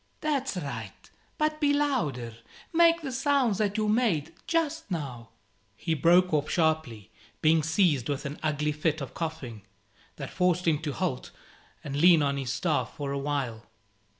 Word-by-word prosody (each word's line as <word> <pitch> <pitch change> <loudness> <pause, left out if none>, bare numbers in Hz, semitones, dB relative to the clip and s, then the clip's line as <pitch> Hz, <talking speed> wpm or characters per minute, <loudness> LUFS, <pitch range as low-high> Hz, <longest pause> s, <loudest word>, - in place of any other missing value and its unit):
"That's 275 -8 -1
right; 120 - -7 0.3
but 305 0 0
be 290 -1 +3
louder. 155 - -1 0.4
Make 335 0 +5
the 275 - -3
sounds 260 -5 +1
that 205 0 0
you 215 -1 +1
made 205 - +1
just 325 -3 -1
now 135 - -5 0.2
" 100 - -40
He 165 - -2
broke 175 +3 +4
off 150 0 +1
sharply, 155 - 0 0.3
being 160 +1 +5
seized 155 - +2
with 145 +1 -2
an 140 +1 -5
ugly 150 -1 0
fit 155 +1 -1
of 140 - -6
coughing, 155 -10 -5 0.5
that 140 - -7
forced 180 -1 +1
him 155 -3 +3
to 150 -3 -4
halt 165 -8 -2 0.5
and 140 -2 -5
lean 165 +1 +6
on 140 -1 0
his 130 -2 -3
staff 145 -6 -1
for 140 -2 -4
a 140 - -2
while. 135 -6 -3
160 Hz, 165 wpm, -28 LUFS, 140-205 Hz, 0.5 s, lean